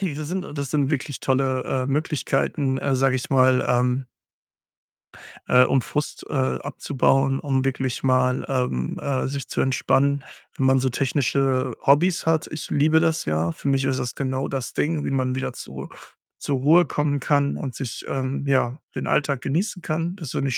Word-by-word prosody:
Diese 155 -6 -3
sind 180 -2 -5
das 140 -2 -3
sind 145 -2 +1
wirklich 145 -1 -2
tolle, 130 -1 +1
äh, 130 -1 -1
Möglichkeiten, 140 -2 0
äh, 140 -1 0
sage 130 0 +2
ich 125 - -5
mal, 130 -1 +4
ähm 125 +1 +1 1.4
äh, 125 0 +6
um 130 0 +2
Frust, 150 +4 -4
äh, - - -5
abzubauen, 135 0 +1
um 135 -2 0
wirklich 130 -1 -2
mal, 130 -1 +2
ähm, 125 - -1
äh, 135 -3 -1
sich 140 0 -4
zu - - -1
entspannen, 135 +1 +2 0.3
wenn 135 - 0
man 130 0 +4
so 130 0 +1
technische 130 -1 0
Hobbys 165 +6 +3
hat. 160 -1 +2
Ich 155 - -6
liebe 155 +2 +3
das 160 -1 +1
ja. 80 +2 0
Für 140 - -7
mich 135 -1 +2
ist 130 - 0
das 125 - -3
genau 130 0 -2
das 135 -2 -4
Ding, 150 -1 0
wie - - -2
man 130 -1 0
wieder 130 - -3
zur - - -8 0.5
zur 140 - -1
Ruhe 160 +6 +5
kommen 145 0 -1
kann 140 +1 +1
und 135 -4 -5
sich, 125 -4 -5
ähm, 135 +1 -2
ja, 130 0 +1 0.2
den - - -3
Alltag 140 -3 +1
genießen 180 +5 -1
kann. 165 +4 -2
Das 160 -9 -7
finde 140 - -1
ich 120 - 0
135 Hz, 180 wpm, -23 LUFS, 130-145 Hz, 1.4 s, äh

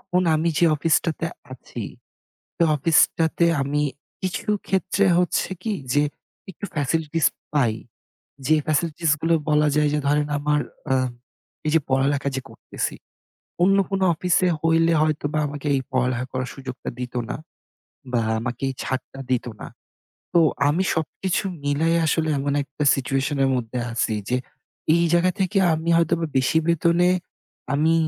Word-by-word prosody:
এখন 180 +1 0
আমি 160 +2 +1
যে - - +4
অফিসটাতে 165 +1 +1 0.3
আছি, 130 - -8 0.7
সে - - +2
অফিসটাতে 165 +2 +3 0.2
আমি 145 +2 0 0.4
কিছু 185 +1 -3 0.2
ক্ষেত্রে 190 +1 +1
হচ্ছে 180 -1 +1
কি, 220 - -1 0.2
যে 145 - +4 0.5
একটু 190 - -7
ফ্যাসিলিটিস 155 +2 0 0.3
পাই। 125 -7 +3 0.7
যে 155 - +5
ফ্যাসিলিটিস 160 +1 0
গুলো 165 0 +2 0.2
বলা 150 0 +4
যায় 150 0 +3
যে - - +2
ধরেন 150 +1 +2
আমার 150 0 +1 0.3
আ - - +5 0.7
এই - - +2
যে 165 - +5
পড়ালেখা 135 +1 +1
যে - - -1
করতেছি, - - -4 0.7
অন্য 195 +2 +5
কোনো 195 -1 0
অফিসে 180 +2 +2
হইলে 165 0 +3
হয়তোবা 155 -1 0
আমাকে 145 +1 -6
এই 135 - 0
পড়ালেখা 130 -1 0
করার 130 0 -3
সুযোগটা 130 -2 -6
দিত 125 0 -5 0.2
না - - -2 0.8
বা 120 - +3 0.2
আমাকে 120 +1 -5
এই - - -3
ছাড়টা 130 +1 -4
দিত 125 - +1 0.2
না। - - -6 0.7
তো 170 - +6 0.3
আমি 170 +6 +1
সবকিছু 175 +4 -1 0.2
মিলায় 155 +4 +2
আসলে 160 0 +1
এমন 140 +1 -1
একটা 145 +1 -5
সিচুয়েশন 135 +2 -1
এর 135 - +3
মধ্যে 125 0 -3
আছি। 115 -1 0 0.2
যে 125 - +2 0.6
এই 170 - +3
জায়গা 175 +1 +4
থেকে 195 +2 0 0.2
আমি 160 +1 -2
হয়তোবা 170 0 +1
বেশি 130 +5 +2
বেতনে 170 +1 +3 0.6
আমি 155 +3 +3
155 Hz, 145 wpm, -23 LUFS, 135-170 Hz, 0.8 s, তো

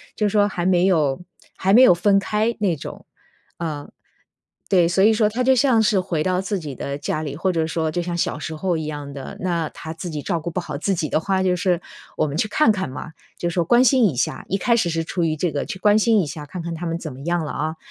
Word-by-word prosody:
就 210 -1 +1
说 205 0 +3
还 175 -3 -3
没 180 -1 +3
有 155 -6 +2 0.4
还 190 +1 +2
没 240 - +8
有 255 - +8
分 195 +3 +3
开 215 +3 0
那 190 -5 +2
种， - - -9 0.5
呃 150 -4 -5 0.8
对。 180 -3 +4
所 185 +3 +2
以 215 - +6
说， 215 -1 +3
他 240 +4 -1
就 265 +1 +5
像 255 -3 +4
是 210 -2 +3
回 175 -4 -1
到 185 +1 +1
自 195 0 -2
己 150 -5 -7
的 140 +3 -4
家 155 +1 -3
里， 145 -2 -5
或 185 +5 0
者 165 -2 0
说 160 -1 -1
就 175 - -1
像 175 0 -3
小 155 - -1
时 155 +2 -5
候 175 +1 -1
一 160 - -4
样 145 -2 -6
的。 135 -1 -8
那 170 -3 -1
他 160 -1 -8
自 170 +2 -6
己 150 -3 -4
照 170 +2 -1
顾 165 +2 -5
不 180 - -2
好 150 -4 -6
自 195 +6 0
己 155 -3 -2
的 - - +1
话 190 +3 0
就 185 -1 +2
是 180 -1 0 0.4
我 - - +2
们 145 +1 -4
去 215 - +1
看 225 +3 +3
看 190 -7 -2
嘛， 145 +4 -7 0.3
就 175 - -2
说 170 0 0
关 240 +8 +5
心 255 -1 +4
一 145 - -5
下， 125 - -2
一 - - 0
开 235 +4 +2
始 180 -7 +1
是 165 0 -1
出 175 +2 -2
于 155 -1 0
这 170 +2 0
个 145 - -2
去 195 - -6
关 210 +2 +4
心 220 -1 +4
一 - - -1
下， 150 +1 -7
看 175 +5 -7
看 170 0 -4
他 170 +2 -6
们 165 0 -2
怎 155 - -6
么 130 - -12
样 170 +2 -1
了， - - -4
啊。 155 +2 -3
175 Hz, 290 characters per minute, -22 LUFS, 155-195 Hz, 0.8 s, 没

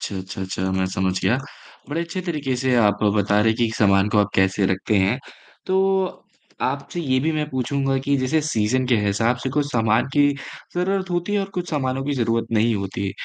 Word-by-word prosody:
अच्छा, 100 - -4
अच्छा, 95 +1 -7
अच्छा 95 0 -2
मैं 95 0 0
समझ 95 0 +1
गया, 110 +6 +3 0.5
बड़े 155 +3 -2
अच्छे 170 +2 -4
तरीके 150 -6 -1
से 130 0 +1
आप 105 -3 +3
बता 105 0 +2
रहे 110 - +3
हैं 110 - +1
कि 115 -2 +1
सामान 100 -1 +4
को 105 - +2
आप 105 -1 +3
कैसे 95 +1 +2
रखते 95 +3 0
हैं। 95 +7 +2 0.5
तो, 190 0 +1 0.4
आपसे 175 - -4
ये 130 -5 +1
भी 160 - +2
मैं 150 -1 -1
पूछूँगा 135 +1 0
कि 140 0 +2
जैसे 130 +5 +1
सीज़न 125 0 +1
के 125 -2 +3
हिसाब 115 +4 +1
से 130 - -1
कुछ 145 +1 0
सामान 110 -1 +2
की 145 -1 +5 0.5
ज़रूरत 190 +1 -1
होती 175 +3 -1
है 205 - +2
और 195 - -3
कुछ 180 -1 -3
सामानों 135 -3 -1
की 145 - -1
ज़रूरत 115 -2 0
नहीं 115 +1 +3
होती। 100 0 -3
125 Hz, 210 wpm, -22 LUFS, 105-150 Hz, 0.5 s, की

